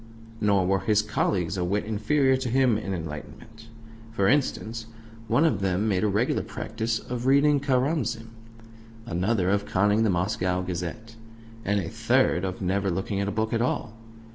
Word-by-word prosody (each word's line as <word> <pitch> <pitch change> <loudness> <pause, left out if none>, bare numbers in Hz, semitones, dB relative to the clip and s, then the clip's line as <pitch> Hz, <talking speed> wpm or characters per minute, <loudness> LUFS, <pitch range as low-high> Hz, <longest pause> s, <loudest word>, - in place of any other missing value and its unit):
Nor 100 -3 +3
were 95 +1 +2
his 105 +2 +2
colleagues 100 -3 -1
a 90 - 0
wit 100 +4 -1
inferior 130 +6 +2
to 130 -1 -3
him 130 -1 +3
in 105 -2 -3
enlightenment. 95 +7 -7 0.4
For 100 -4 +1
instance, 115 -4 0 0.4
one 145 +8 +3
of 160 - +2
them 95 +2 0
made 95 -2 +1
a - - +3
regular 105 +5 +1
practice 110 0 -3
of 125 +2 -5
reading 140 +1 +4
Karamzin, 130 -4 0 0.8
another 95 -1 0
of 100 0 0
conning 105 +3 +2
the 110 - +3
Moscow 90 0 0
Gazette, 90 +6 -5 0.5
and 100 +1 +1
a 90 - -3
third 90 +1 +1
of 95 0 -4
never 95 +2 0
looking 95 +2 -2
at 100 - -1
a - - -1
book 110 +1 -1
at 115 - +1
all. 120 -2 -1
105 Hz, 165 wpm, -26 LUFS, 95-115 Hz, 0.8 s, reading